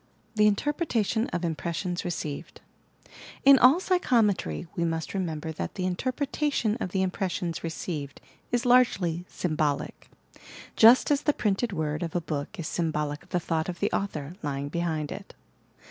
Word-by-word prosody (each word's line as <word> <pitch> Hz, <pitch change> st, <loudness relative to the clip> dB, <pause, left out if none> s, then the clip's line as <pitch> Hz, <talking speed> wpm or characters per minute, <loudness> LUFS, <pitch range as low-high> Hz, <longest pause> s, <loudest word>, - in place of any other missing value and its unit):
THE 210 Hz, -1 st, +4 dB
INTERPRETATION 230 Hz, -, 0 dB
OP 175 Hz, 0 st, -2 dB
IMPRESSIONS 170 Hz, +3 st, -2 dB
RECEIVED 160 Hz, -5 st, -5 dB, 0.8 s
In 275 Hz, -1 st, +9 dB
all 265 Hz, +7 st, +7 dB
psychometry 240 Hz, -, +1 dB
we 170 Hz, -, 0 dB
must 165 Hz, -1 st, -2 dB
remember 160 Hz, -5 st, -3 dB
that 155 Hz, -, -5 dB
the 185 Hz, -, -2 dB
in 185 Hz, -1 st, 0 dB
terpretation 260 Hz, -, -1 dB
of -, -, -2 dB
the 190 Hz, +1 st, 0 dB
impressions 185 Hz, -2 st, -2 dB
received 160 Hz, -3 st, -5 dB, 0.3 s
is 245 Hz, +1 st, 0 dB
largely 190 Hz, -9 st, +3 dB
sym 165 Hz, -4 st, -2 dB
bolic, 150 Hz, -2 st, -2 dB, 0.3 s
— -, -, -20 dB, 0.3 s
just 235 Hz, +6 st, +7 dB
as 285 Hz, -1 st, +3 dB
the 295 Hz, -1 st, +2 dB
printed 215 Hz, 0 st, 0 dB
word 155 Hz, -4 st, -2 dB
of 170 Hz, -1 st, -4 dB
a -, -, +3 dB
book 155 Hz, +5 st, -4 dB
is 160 Hz, -, -3 dB
symbolic 150 Hz, -3 st, -2 dB
of 180 Hz, -, -21 dB
the 180 Hz, -, 0 dB
thought 160 Hz, 0 st, -1 dB
of 175 Hz, -1 st, -5 dB
the -, -, 0 dB
author, 155 Hz, -6 st, -3 dB
lying 140 Hz, -1 st, -3 dB
behind 160 Hz, -2 st, -2 dB
it. -, -, -8 dB
180 Hz, 160 wpm, -27 LUFS, 160-225 Hz, 0.8 s, In